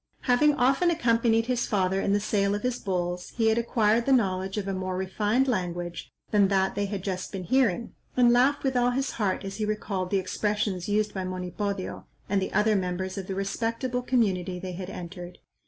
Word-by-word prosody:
Having 285 +4 +4
often 270 +7 +3
accompanied 230 -6 +2
his 250 0 0
father 190 -1 +1
in 200 - 0
the 205 - +3
sale 200 -1 +1
of 205 - -5
his 250 -1 -1
bulls, 180 -2 -3
he 225 -1 +3
had 220 +1 +2
acquired 230 0 +2
the - - +3
knowledge 190 -5 +1
of 200 -2 -2
a 195 - -1
more 185 -1 -3
refined 210 +7 +1
language 175 -6 -3 0.2
than 205 -2 +5
that 190 -1 +1
they 205 0 -1
had 195 -2 -4
just 185 -2 -3
been 195 -2 -5
hearing, 235 0 +1 0.2
and 240 -1 +6
laughed 265 +4 +3
with 265 -1 0
all 245 0 +3
his 270 +2 -1
heart 205 -3 -1
as 195 0 -5
he 220 - -2
recalled 205 -3 -2
the 200 - +2
expressions 200 0 -1
used 210 0 +1
by 190 - -3
Monipodio, 185 +2 -4 0.2
and 195 0 +1
the 190 - -3
other 215 0 +3
members 185 0 -2
of 190 -2 -5
the 190 - -3
respectable 230 +5 -2
community 195 -8 0
they 185 0 -6
had 185 +1 -6
entered. 180 -1 -8
205 Hz, 205 wpm, -27 LUFS, 185-235 Hz, 0.2 s, and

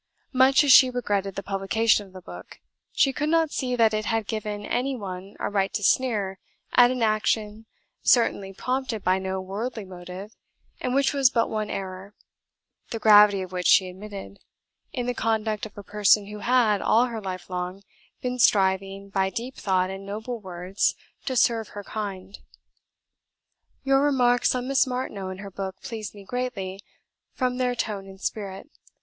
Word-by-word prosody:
Much 260 +2 +5
as 285 - +4
she 255 0 +9
regretted 205 -6 -2
the 195 - -4
publication 200 +2 +1
of 190 - -20
the 185 -1 -11
book, - - -11 0.3
she 270 - +2
could 295 +3 -1
not 325 -1 +2
see 250 -2 -1
that 225 -2 +4
it 215 0 -1
had 225 -1 0
given 210 -1 -4
any 265 +2 -1
one 195 -3 -7
a - - -1
right 195 -1 0
to 205 - -2
sneer 205 -5 +1 0.3
at 245 -1 +7
an 250 -2 -1
action, 215 0 0 0.3
certainly 200 -5 +3
prompted 250 +1 -3
by 185 +1 +2
no 190 0 -3
worldly 210 +4 -5
motive, 185 +3 -9 0.4
and 250 0 -2
which 275 +1 +2
was 275 -3 +4
but 230 -2 0
one 215 -1 -2
error 190 +1 -6 0.7
the 230 - -3
gravity 210 -2 +6
of 185 - -9
which 180 -1 -1
she 185 -1 +5
admitted 200 +1 -9 0.5
in 245 -2 -3
the 245 - -1
conduct 220 -2 -1
of 210 - -22
a 205 - -8
person 205 0 +3
who 210 +1 -8
had, 230 -4 +3
all 235 +3 +4
her 230 -3 -5
life 185 -2 -6
long, 180 +1 -5 0.4
been 250 0 -2
striving, 195 -2 +2
by 190 -1 0
deep 235 +7 -5
thought 185 -1 0
and 195 +1 -7
noble 220 +4 -5
words, 185 0 -1 0.3
to 260 - -1
serve 230 -2 +2
her 205 - -8
kind. 200 -2 -6 1.4
"Your 270 0 +3
remarks 250 -4 +3
on 250 0 -3
Miss 270 0 +3
Martineau 250 -7 -4
and 190 +1 -7
her 200 -1 -8
book 190 0 -6
pleased 220 -5 -6
me 200 - -11
greatly, 200 -5 -4 0.5
from 250 -2 -1
their 250 -1 0
tone 205 -4 -3
and 195 0 -12
spirit. 195 0 -5
210 Hz, 175 wpm, -25 LUFS, 195-245 Hz, 1.4 s, she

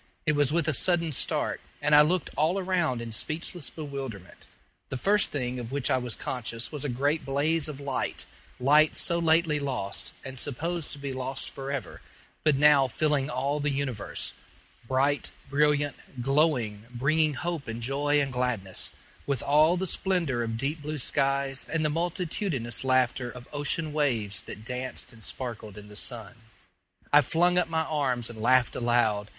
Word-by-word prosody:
It 155 - +4
was 145 -1 +3
with 165 0 +1
a 155 - +2
sudden 170 +4 +2
start, 135 - -1 0.2
and 150 +1 +1
I 150 - +10
looked 170 +3 +1
all 160 +5 +2
around 175 -10 0
in 115 -1 -6
speechless 160 +6 -3
bewilderment. 135 - -7 0.4
The 135 - -3
first 200 +10 +3
thing 125 -3 -2
of 120 0 -6
which 140 -2 -1
I 130 - +3
was 125 -3 -3
conscious 115 -2 -4
was 150 -3 -4
a 145 - -1
great 140 +6 0
blaze 150 +3 +1
of 145 -2 -7
light 140 -2 -2 0.3
light 150 +4 +5
so 170 0 +3
lately 160 -2 +3
lost, 130 -8 -3
and 130 -1 -6
supposed 160 +5 -2
to - - -8
be 140 -1 -4
lost 130 +1 -1
forever, 135 -1 -5 0.4
but 155 -2 +4
now 140 -1 +6
filling 145 +2 0
all 135 +4 -1
the 145 0 0
universe 135 -6 -2 0.5
bright, 135 +3 +1 0.2
brilliant, 145 0 +2 0.3
glowing 130 -7 +1
bringing 145 +5 +2
hope 170 -2 -3
and 115 +1 -4
joy 145 +3 +2
and 135 -2 -1
gladness, 120 -7 +1 0.4
with 140 -4 -1
all 155 +5 +4
the 190 - -1
splendor 175 -10 0
of 115 -1 -2
deep 145 +6 -2
blue 150 +1 -4
skies 135 0 +1
and 160 -1 +1
the 150 - +2
multitudinous 165 - -1
laughter 130 -1 +2
of 125 0 -10
ocean 145 +2 -1
waves 115 -10 0
that 105 - -9
danced 125 0 -3
and 110 -1 -14
sparkled 110 -5 -5
in 105 0 -10
the 105 - -11
sun. 115 -1 -2 0.8
I 145 - +9
flung 175 +4 +3
up 180 - 0
my 160 0 +1
arms 130 -7 -1
and 110 -2 -9
laughed 125 +1 +4
aloud. 120 -4 +2
140 Hz, 170 wpm, -28 LUFS, 125-155 Hz, 0.8 s, I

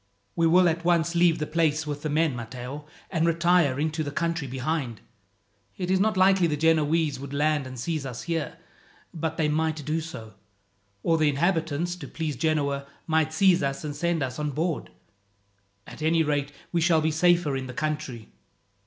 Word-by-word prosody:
"We 165 -1 +3
will 180 +2 +5
at 170 0 0
once 170 -1 +2
leave 170 -1 +4
the 150 - -2
place 155 -1 +1
with 145 -1 -4
the 155 - -2
men, 155 -2 +1
Matteo, 125 +5 -7 0.2
and 165 -4 +1
retire 170 -4 +3
into 155 +1 -1
the 145 - -3
country 165 0 -2
behind. 130 -2 -3 0.8
It 180 0 -2
is 190 - +3
not 215 0 +2
likely 190 -1 +5
the 150 -2 -1
Genoese 160 -2 +2
would 140 0 -7
land 150 -2 +1
and 130 -1 -8
seize 155 +3 -2
us 125 -3 -6
here, 165 -3 -3 0.6
but 160 -1 -3
they 155 - +2
might 155 -1 -1
do 160 +2 -1
so, 115 -9 -9 0.7
or 165 -1 +2
the 155 -1 +4
inhabitants, 165 +2 0
to - - -8
please 155 -3 -3
Genoa, 140 -1 0 0.2
might 160 -1 +1
seize 180 +2 +4
us 140 0 -2
and 150 -1 -4
send 170 -2 0
us 130 +1 -4
on 150 0 -1
board. 160 +3 -2 1.0
At - - -11
any 160 +1 +3
rate, 145 -1 -1 0.2
we 170 - +1
shall 165 -1 +4
be 160 +1 +1
safer 170 -2 +3
in 130 -1 -4
the - - -6
country." 150 -7 -3
155 Hz, 185 wpm, -26 LUFS, 145-170 Hz, 1.0 s, will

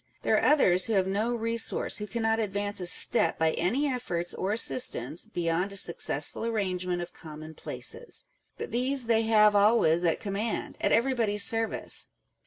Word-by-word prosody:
There - - +2
are - - +2
others 185 -12 +3
who 225 - -2
have 190 -2 +2
no 215 +5 -2
resource, 230 0 -1
who 210 -1 -6
cannot 225 +1 -1
advance 205 -1 -3
a 180 - -1
step 165 -1 +4
by 160 0 +1
any 225 - -1
efforts 205 -11 -2
or 190 - -3
assistance, 175 - +2
beyond 175 +3 -2
a - - -10
successful 170 -3 +1
arrange 195 -6 -3
ment 175 -1 -2
of 175 - -11
commonplaces: 160 - -6 0.3
but - - -7
these 255 +1 0
they 225 -1 +2
have 215 -2 +3
always 200 -5 +3
at 165 -2 0
command, 205 +2 -4
at - - 0
everybody's 230 -4 +1
service. 225 0 -1
205 Hz, 165 wpm, -27 LUFS, 175-230 Hz, 0.3 s, step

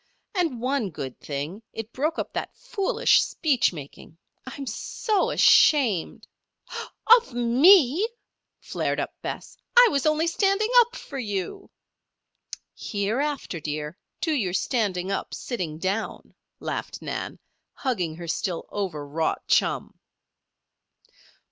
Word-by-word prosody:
"And 335 - 0
one 255 -3 0
good 135 -5 -7
thing 150 +8 -5
it 225 +1 -7
broke 310 +5 -1
up - - -4
that - - -4
foolish 470 -6 +2
speech 265 -8 +1
making. 155 0 -11 0.3
I'm 275 +2 -6
so 390 - -1
ashamed 245 - +4 0.4
" 470 +1 +3
"Of 450 - -15
me!" 285 - +5 0.5
flared - - -2
up - - -3
Bess. - - -6 0.2
"I - - +9
was 280 0 +1
only 310 +1 +2
standing 395 +6 +1
up 480 0 +3
for 275 - -7
you." 220 - -4 1.0
"Hereafter, 230 - -2
dear, 150 +1 -4 0.3
do 325 - 0
your 200 -11 0
standing 195 -3 0
up, 195 - -3
sitting 180 - -4
down," 195 +6 -3 0.3
laughed - - -5
Nan, - - -4 0.4
hugging 185 - -2
her 170 0 -8
still 170 +1 -2
overwrought 160 -5 -2
chum. - - +1
235 Hz, 115 wpm, -25 LUFS, -, 1.0 s, I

